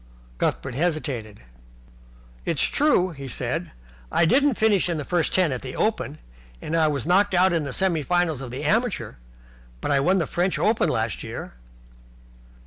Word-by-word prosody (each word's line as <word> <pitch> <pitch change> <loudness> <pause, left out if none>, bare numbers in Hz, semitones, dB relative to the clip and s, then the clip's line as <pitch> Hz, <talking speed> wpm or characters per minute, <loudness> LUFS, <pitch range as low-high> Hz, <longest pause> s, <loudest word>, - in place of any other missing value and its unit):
Cuthbert 130 - -1
hesitated. 140 - -2 1.0
"It's 160 - +1
true," 230 -12 +3
he 140 -4 -8
said, 125 - -3 0.4
"I 170 - +3
didn't 275 - +3
finish 205 -5 +2
in 170 - -1
the 150 - -4
first 175 -3 0
ten 180 -5 +2
in 125 - -3
the 130 -1 -7
Open, 210 -9 -1 0.4
and 160 - -4
I 160 -1 +4
was 145 -3 -1
knocked 190 +3 +3
out 185 +1 +4
in 165 -3 0
the 140 - -4
semi 170 +2 +1
final 165 -1 0
of 130 - -6
the 130 +4 -5
Amateur, 185 - 0 0.6
but - - -2
I 140 - +4
won 185 +7 +3
the 170 - +1
French 180 +2 0
Open 220 +1 +2
last 110 -3 -1
year." - - -7
165 Hz, 170 wpm, -24 LUFS, 140-185 Hz, 1.0 s, I